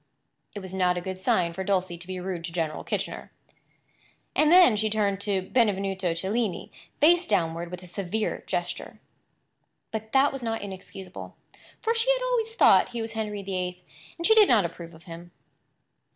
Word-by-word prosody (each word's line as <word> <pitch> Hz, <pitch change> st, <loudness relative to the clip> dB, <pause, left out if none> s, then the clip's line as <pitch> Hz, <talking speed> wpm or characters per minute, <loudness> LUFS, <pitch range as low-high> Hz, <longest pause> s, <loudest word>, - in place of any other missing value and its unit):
It 205 Hz, -, -5 dB
was 190 Hz, -1 st, -9 dB
not 180 Hz, -1 st, +1 dB
a -, -, 0 dB
good 185 Hz, +1 st, -6 dB
sign 170 Hz, -2 st, +1 dB
for 190 Hz, -, -4 dB
Dulcie 185 Hz, -2 st, 0 dB
to 180 Hz, -, -10 dB
be 185 Hz, -1 st, -5 dB
rude 180 Hz, -2 st, -4 dB
to 170 Hz, -, -6 dB
General 165 Hz, -3 st, -2 dB
Kitchener. -, -, -4 dB, 1.0 s
And 305 Hz, +1 st, +4 dB
then 355 Hz, -10 st, +7 dB
she 215 Hz, +1 st, 0 dB
turned 205 Hz, -2 st, 0 dB
Benvenuto 195 Hz, -3 st, 0 dB
Cellini 200 Hz, +3 st, -2 dB, 0.3 s
face 345 Hz, +4 st, +5 dB
downward 170 Hz, -4 st, 0 dB
with 180 Hz, +1 st, -8 dB
a -, -, -9 dB
severe 195 Hz, +4 st, -3 dB
gesture. -, -, -4 dB, 0.9 s
But 220 Hz, 0 st, -5 dB
that 275 Hz, +1 st, +4 dB
was 270 Hz, -, -5 dB
not 225 Hz, -2 st, -3 dB
inexcusable; 190 Hz, -1 st, -9 dB, 0.5 s
for 455 Hz, -, +2 dB
she 465 Hz, +1 st, 0 dB
had -, -, -2 dB
always 460 Hz, -3 st, -1 dB
thought -, -, +5 dB
he 240 Hz, -1 st, -4 dB
was 225 Hz, -, -5 dB
Henry 210 Hz, -2 st, -4 dB
VIII, 180 Hz, -2 st, -4 dB, 0.3 s
and 335 Hz, -, -3 dB
she 445 Hz, -, +6 dB
did 435 Hz, -2 st, +7 dB
not 215 Hz, -6 st, +5 dB
approve 170 Hz, 0 st, -8 dB
of 165 Hz, -, -17 dB
him. 170 Hz, 0 st, -10 dB
195 Hz, 175 wpm, -26 LUFS, 180-230 Hz, 1.0 s, then